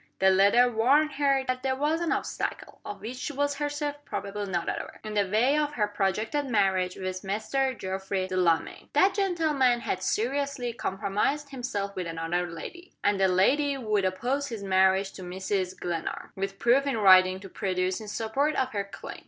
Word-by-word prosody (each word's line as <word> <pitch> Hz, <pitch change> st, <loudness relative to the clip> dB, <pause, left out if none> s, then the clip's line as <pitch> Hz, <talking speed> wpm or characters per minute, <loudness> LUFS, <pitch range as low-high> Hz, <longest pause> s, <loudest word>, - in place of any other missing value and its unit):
The 190 Hz, 0 st, +4 dB
letter 200 Hz, +6 st, +5 dB
warned 265 Hz, +7 st, +3 dB
her 275 Hz, -1 st, +2 dB
that 255 Hz, 0 st, -1 dB
there 265 Hz, 0 st, 0 dB
was 300 Hz, +4 st, 0 dB
an 340 Hz, -, 0 dB
obstacle, -, -, -3 dB
of 205 Hz, -, -7 dB
which 240 Hz, +4 st, -6 dB
she 290 Hz, +3 st, -4 dB
was 285 Hz, 0 st, -1 dB
herself 290 Hz, 0 st, -2 dB
probably 205 Hz, -5 st, -4 dB
not 175 Hz, -3 st, -2 dB
aware, -, -, -4 dB
in 215 Hz, -1 st, -5 dB
the 205 Hz, -2 st, +1 dB
way 240 Hz, +8 st, +3 dB
of 300 Hz, -1 st, 0 dB
her 210 Hz, -6 st, +1 dB
projected 210 Hz, +8 st, -1 dB
marriage 190 Hz, -5 st, +1 dB
with 185 Hz, 0 st, -4 dB
Mr. 220 Hz, +6 st, -1 dB
Geoffrey 190 Hz, 0 st, -3 dB
Delamayn. 180 Hz, -3 st, 0 dB
That 385 Hz, +1 st, +4 dB
gentleman 310 Hz, -, +2 dB
had 185 Hz, -, -2 dB
seriously 250 Hz, +4 st, -1 dB
compromised 210 Hz, +8 st, -1 dB
himself 205 Hz, -6 st, -4 dB
with 180 Hz, -2 st, -3 dB
another 165 Hz, +2 st, -2 dB
lady; 345 Hz, -, -9 dB
and 200 Hz, -1 st, +2 dB
the 190 Hz, -, +4 dB
lady 275 Hz, +10 st, +2 dB
would 215 Hz, -5 st, 0 dB
oppose 245 Hz, +10 st, -1 dB
his 225 Hz, -6 st, -6 dB
marriage 190 Hz, 0 st, +3 dB
to 190 Hz, -, -11 dB
Mrs. 185 Hz, +1 st, -3 dB
Glenarm, 170 Hz, -2 st, -4 dB
with 195 Hz, 0 st, -4 dB
proof 260 Hz, +6 st, +3 dB
in 270 Hz, -, 0 dB
writing 185 Hz, -2 st, +6 dB
to 195 Hz, -, -10 dB
produce 185 Hz, +1 st, -2 dB
in 215 Hz, -, -8 dB
support 235 Hz, +8 st, -1 dB
of 260 Hz, 0 st, 0 dB
her 200 Hz, -2 st, -2 dB
claim. 200 Hz, -, -9 dB
210 Hz, 180 wpm, -27 LUFS, 190-275 Hz, -, writing